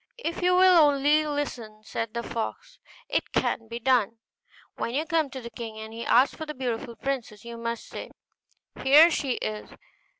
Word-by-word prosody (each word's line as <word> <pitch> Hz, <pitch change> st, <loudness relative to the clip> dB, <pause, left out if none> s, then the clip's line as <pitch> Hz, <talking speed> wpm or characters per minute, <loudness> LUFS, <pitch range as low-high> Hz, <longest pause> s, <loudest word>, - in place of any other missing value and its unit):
'If 340 Hz, -8 st, -4 dB
you 360 Hz, 0 st, +3 dB
will 370 Hz, -1 st, +6 dB
only 295 Hz, +1 st, +4 dB
listen,' 240 Hz, -8 st, -4 dB
said 225 Hz, +1 st, -5 dB
the 235 Hz, -, -2 dB
fox, -, -, -5 dB, 0.3 s
'it -, -, -1 dB
can 225 Hz, -, 0 dB
be 235 Hz, +1 st, -5 dB
done. 230 Hz, -3 st, +2 dB, 0.6 s
When 235 Hz, -, -3 dB
you 305 Hz, +3 st, 0 dB
come 325 Hz, -4 st, +1 dB
to 260 Hz, -1 st, -7 dB
the 235 Hz, 0 st, -9 dB
king, 225 Hz, -1 st, -7 dB
and 220 Hz, 0 st, -8 dB
he 230 Hz, +1 st, -6 dB
asks 255 Hz, +3 st, +4 dB
for 315 Hz, -, -7 dB
the 300 Hz, -, -6 dB
beautiful 240 Hz, -1 st, -4 dB
princess, 235 Hz, -3 st, -4 dB
you 235 Hz, 0 st, -7 dB
must 230 Hz, 0 st, -4 dB
say, -, -, -8 dB, 0.7 s
"Here 300 Hz, +5 st, +7 dB
she 275 Hz, -5 st, 0 dB
is!" 215 Hz, -2 st, -5 dB
255 Hz, 180 wpm, -26 LUFS, 230-300 Hz, 0.7 s, Here